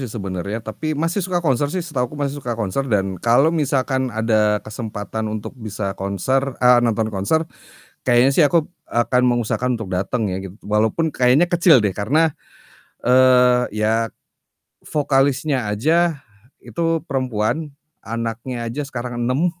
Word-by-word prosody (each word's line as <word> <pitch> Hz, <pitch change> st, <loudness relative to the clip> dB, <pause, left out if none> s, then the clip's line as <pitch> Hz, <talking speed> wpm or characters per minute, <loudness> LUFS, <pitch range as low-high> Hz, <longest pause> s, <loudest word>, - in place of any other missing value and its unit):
sih 130 Hz, -, -4 dB
sebenarnya, 100 Hz, +1 st, -5 dB
tapi 155 Hz, +7 st, -4 dB
masih 165 Hz, +6 st, 0 dB
suka 175 Hz, -1 st, -2 dB
konser 145 Hz, 0 st, +2 dB
sih 180 Hz, +1 st, -3 dB
setahuku 135 Hz, -4 st, -3 dB
masih 145 Hz, 0 st, -3 dB
suka 120 Hz, -3 st, -4 dB
konser 115 Hz, +6 st, -2 dB
dan 95 Hz, -5 st, -1 dB
kalau 135 Hz, +8 st, +4 dB
misalkan 135 Hz, -4 st, 0 dB
ada 110 Hz, -2 st, +1 dB
kesempatan 110 Hz, -1 st, -5 dB
untuk 105 Hz, -1 st, -5 dB
bisa 105 Hz, -2 st, -4 dB
konser 125 Hz, +8 st, -1 dB
ah, 125 Hz, -1 st, +7 dB
nonton 110 Hz, -2 st, 0 dB
konser, 100 Hz, +12 st, 0 dB, 0.6 s
kayaknya 120 Hz, +2 st, +5 dB
sih 155 Hz, -, +4 dB
aku 165 Hz, +2 st, +2 dB
b 175 Hz, -, -22 dB, 0.2 s
akan 120 Hz, +2 st, +1 dB
mengusahakan 120 Hz, +1 st, 0 dB
untuk 110 Hz, -5 st, -7 dB
dateng 95 Hz, +3 st, -1 dB
ya 95 Hz, -, -3 dB
gitu 95 Hz, -, -14 dB
walaupun 110 Hz, +10 st, +1 dB
kayaknya 125 Hz, +6 st, +4 dB
kecil 170 Hz, -, +5 dB
deh 100 Hz, -, +1 dB
karena, 145 Hz, -, +1 dB, 0.7 s
eee, 125 Hz, -1 st, +5 dB
ya 110 Hz, +2 st, +1 dB, 0.7 s
vokalisnya 140 Hz, -4 st, 0 dB
aja 155 Hz, +7 st, +1 dB, 0.3 s
itu 165 Hz, -1 st, -1 dB
perempuan, 130 Hz, +1 st, -1 dB, 0.3 s
anaknya 115 Hz, +2 st, -4 dB
aja 120 Hz, +6 st, -4 dB
sekarang 120 Hz, -1 st, -5 dB
6. 135 Hz, +9 st, +1 dB
125 Hz, 145 wpm, -20 LUFS, 110-145 Hz, 0.7 s, ah